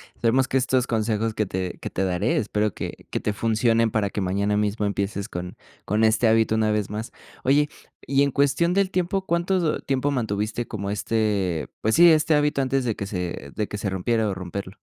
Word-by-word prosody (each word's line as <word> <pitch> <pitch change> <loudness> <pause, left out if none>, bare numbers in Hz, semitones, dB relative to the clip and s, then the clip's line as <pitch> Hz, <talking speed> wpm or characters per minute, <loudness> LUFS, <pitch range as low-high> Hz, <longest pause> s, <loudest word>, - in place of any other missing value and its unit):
Esperemos 130 +3 +2
que 135 - +1
estos 130 -1 +1
consejos 110 -1 0
que 105 -1 0
te 95 -1 -4
que - - -5
te 95 - -2
daré, 95 +5 0
espero 105 -2 0
que - - -7
que - - -2
te 105 - -2
funcionen 115 +1 +2
para 105 -2 0
que 100 - -3
mañana 100 +3 0
mismo 105 0 0
empieces 100 0 -2
con 90 0 -6 0.3
con 105 +3 +1
este 110 +2 +4
hábito 110 0 +3
una 110 -1 +2
vez 105 -2 -1
más. 110 +3 -5 0.3
Oye, 145 +3 +3 0.4
y 140 +1 +3
en 140 - +1
cuestión 145 +6 +2
del 195 -1 +1
tiempo, 185 +1 -1
¿cuánto 170 -1 +1
tiempo 135 +1 0
mantuviste 110 -2 -2
como 100 -2 -4
este, 100 - -1
pues 110 - +2
sí, 170 +1 +8
este 155 0 +3
hábito 150 -1 +2
antes 135 0 0
de 115 - 0
que 100 - -4
se 90 -7 -5
de 105 - -1
que 105 - -5
se 100 0 -2
rompiera, 110 +4 0
o, - - -1
romperlo? 95 +1 -6
110 Hz, 205 wpm, -24 LUFS, 100-135 Hz, 0.4 s, sí